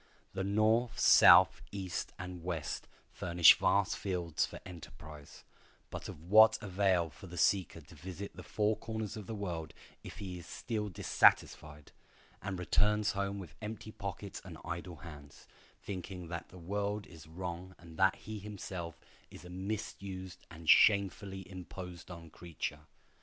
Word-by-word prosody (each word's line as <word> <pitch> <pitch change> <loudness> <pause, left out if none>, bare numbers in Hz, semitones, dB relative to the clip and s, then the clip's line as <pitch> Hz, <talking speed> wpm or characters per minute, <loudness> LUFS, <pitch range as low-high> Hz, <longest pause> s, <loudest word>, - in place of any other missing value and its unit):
The 95 0 -2
North, 110 +4 +2
South, - - +8
East, 95 -3 -4
and 90 -1 -7
West 85 -4 -3 0.2
furnish 85 -1 +6
vast 100 +2 +2
fields 90 -5 -1
for - - -9
enterprise; 75 -4 -11 0.5
but - - -6
of 75 - -10
what 110 +5 +7
avail 95 -4 +1
for 95 - -12
the 90 0 -9
seeker 90 -1 +2
to 80 - -16
visit 95 +5 -8
the - - -8
four 105 0 0
corners 110 -1 -4
of 105 -4 -8
the 110 - -4
world 85 -6 -4 0.3
if - - -9
he 90 -3 -6
still 105 +5 -4
is 100 - -9
dissatisfied, 75 -2 +2 0.5
and 95 -1 -4
returns 105 +4 +2
home 100 0 -2
with 90 -6 -8
empty 110 0 -6
pockets 100 0 -6
and 90 -4 -9
idle 85 0 -5
hands, 75 -3 -12 0.4
thinking 90 -2 -6
that 85 -1 -5
the 90 - -13
world 100 +3 -2
is 80 -3 -13
wrong 90 +2 -6
and 85 -2 -14
that 95 0 +4
he 110 0 -7
himself 95 -5 -6 0.3
is - - -12
a 90 - -10
misused 95 -2 -6
and 80 0 -11
shamefully 100 -1 +4
imposed 90 -1 -9
on 85 -3 -10
creature? 80 -3 -6
95 Hz, 150 wpm, -33 LUFS, 85-100 Hz, 0.5 s, South